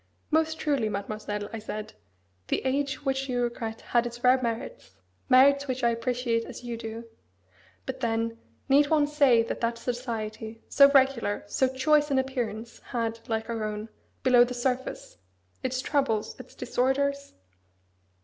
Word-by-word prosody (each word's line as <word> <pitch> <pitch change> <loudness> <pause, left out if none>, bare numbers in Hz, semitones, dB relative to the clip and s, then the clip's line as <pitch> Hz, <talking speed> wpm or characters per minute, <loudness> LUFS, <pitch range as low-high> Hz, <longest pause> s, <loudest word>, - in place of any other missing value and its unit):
"Most 320 0 +2
truly, 275 -8 0
Mademoiselle," 205 0 -4
I 225 - -4
said, 215 0 -6 0.5
"the - - -1
age 275 +2 -1
which 270 0 -1
you 245 -1 0
regret 225 -2 -4
had 240 0 +1
its 240 0 -9
rare 255 +1 +5
merits 230 - -4 0.3
merits 280 +2 +6
which 255 -1 -3
I 235 - +4
appreciate 235 0 -1
as 245 - -9
you 240 -1 -4
do. 225 0 -6 0.8
But 260 0 -5
then, 230 -1 -1 0.3
need 285 +1 +5
one 305 -2 +4
say 280 -6 +4
that 230 - -5
that 230 0 0
society, 225 -2 -5
so 280 0 +7
regular, 265 -7 +2
so 260 +6 +1
choice 295 +3 +2
in 275 - +1
appearance, 240 -4 -3
had, 230 -2 -3
like 220 0 -1
our 230 -2 -3
own, 215 +1 -4 0.3
below 250 -2 +7
the 250 +1 -3
surface, 255 +1 -3 0.4
its 260 0 -1
troubles, 270 -8 0
its - - -12
disorders? 280 +2 -1
245 Hz, 150 wpm, -27 LUFS, 225-270 Hz, 0.8 s, so